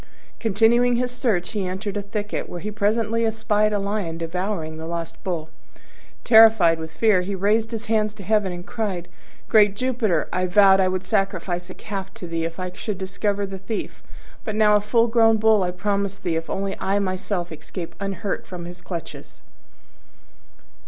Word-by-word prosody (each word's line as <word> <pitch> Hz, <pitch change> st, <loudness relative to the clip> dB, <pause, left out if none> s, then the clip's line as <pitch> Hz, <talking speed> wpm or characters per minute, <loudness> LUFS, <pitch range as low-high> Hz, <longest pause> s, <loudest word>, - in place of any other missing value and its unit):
Continuing 230 Hz, +3 st, +3 dB
his 250 Hz, +1 st, 0 dB
search, 225 Hz, -8 st, -1 dB
he 205 Hz, -4 st, -2 dB
entered 190 Hz, +2 st, -4 dB
a 205 Hz, -, -1 dB
thicket, 205 Hz, +1 st, -4 dB
where 175 Hz, -, -6 dB
he 210 Hz, +4 st, -5 dB
presently 220 Hz, +2 st, +1 dB
espied 215 Hz, -1 st, +1 dB
a 210 Hz, -, +1 dB
lion 200 Hz, -4 st, -2 dB
devouring 165 Hz, -1 st, -3 dB
the 160 Hz, 0 st, -6 dB
lost 170 Hz, -1 st, -5 dB
Bull. 165 Hz, -4 st, -3 dB, 0.7 s
Terrified 220 Hz, -8 st, +6 dB
with 160 Hz, 0 st, -6 dB
fear, 185 Hz, +4 st, +3 dB
he 195 Hz, +2 st, -3 dB
raised 215 Hz, +4 st, +1 dB
his 225 Hz, -1 st, -5 dB
hands 215 Hz, -1 st, 0 dB
to 205 Hz, -, -10 dB
heaven 210 Hz, -1 st, +1 dB
and 175 Hz, 0 st, -7 dB
cried, 200 Hz, -5 st, -3 dB, 0.4 s
"Great 210 Hz, -3 st, +5 dB
Jupiter, 230 Hz, -8 st, 0 dB
I 185 Hz, 0 st, +1 dB
vowed 195 Hz, +1 st, +6 dB
I 190 Hz, -, +4 dB
would 185 Hz, 0 st, -2 dB
sacrifice 185 Hz, -2 st, -1 dB
a 185 Hz, -, -9 dB
calf 195 Hz, -2 st, -6 dB
to -, -, -7 dB
thee 165 Hz, -1 st, -2 dB
if 165 Hz, +2 st, -5 dB
I 185 Hz, 0 st, -3 dB
should 200 Hz, +2 st, -5 dB
discover 200 Hz, +1 st, -2 dB
the 195 Hz, -1 st, -7 dB
thief: 200 Hz, +3 st, -5 dB, 0.4 s
but 215 Hz, -, -4 dB
now 210 Hz, -1 st, +5 dB
a 210 Hz, -, +3 dB
full 230 Hz, +3 st, +3 dB
grown 225 Hz, -1 st, +4 dB
Bull 220 Hz, -1 st, +4 dB
I 180 Hz, -, +1 dB
promise 200 Hz, +2 st, -2 dB
thee 170 Hz, -4 st, -2 dB
if 165 Hz, 0 st, -3 dB
only 195 Hz, 0 st, -2 dB
I 195 Hz, +1 st, 0 dB
myself 185 Hz, -2 st, -2 dB
escape 165 Hz, +2 st, -7 dB
unhurt 195 Hz, 0 st, -3 dB
from 175 Hz, -2 st, -7 dB
his 175 Hz, +1 st, -9 dB
clutches." 170 Hz, -3 st, -8 dB
200 Hz, 180 wpm, -23 LUFS, 180-215 Hz, 0.7 s, Terrified